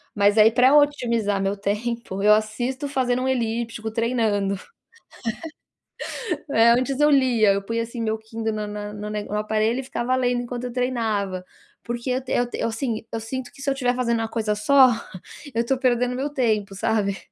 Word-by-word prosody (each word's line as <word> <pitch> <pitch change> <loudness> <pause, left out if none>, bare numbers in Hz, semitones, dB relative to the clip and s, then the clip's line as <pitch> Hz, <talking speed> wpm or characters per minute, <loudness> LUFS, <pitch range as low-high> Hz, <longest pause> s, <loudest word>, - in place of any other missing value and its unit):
mas 205 +1 +3
aí 215 +1 +7
para 255 +4 +5
otimizar 235 -9 +1
meu 195 +1 -1
tempo, 210 0 -3
eu 210 +1 +6
assisto 240 +6 -2
fazendo 255 -2 0
um - - -1
elíptico, 230 -2 -2
treinando. 220 -4 0 1.9
É, 230 -2 +5
antes 255 +3 +1
eu 295 - +5
lia, 250 -7 +4
eu 200 - -1
punha 230 +3 -2
assim 235 +1 -6
meu 220 -1 -1
Kindle 220 0 -4
na 210 -1 -3
na 205 0 -6
na 210 0 -6
nego 210 -1 -5
no 210 - +1
aparelho 215 +3 0
e - - -4
ficava 255 -1 -1
lendo 245 -1 +1
enquanto 245 0 -5
eu 245 - -5
treinava, 220 -7 -1 0.4
porque 240 +2 -4
eu 255 +1 0 0.3
te - - -5
eu - - 0
assim, 225 -1 -3
eu 225 - -3
sinto 245 +3 -5
que 275 - -14
se 280 - -1
eu - - +2
tiver 250 -2 0
fazendo 235 -2 0
uma 225 - -1
coisa 220 -2 -1
só, 260 +5 +6 0.6
eu 230 - +1
estou 265 +3 0
perdendo 250 -1 +1
meu 270 +3 -2
tempo, 220 -8 0
sabe, 200 0 0
230 Hz, 185 wpm, -23 LUFS, 215-250 Hz, 1.9 s, aí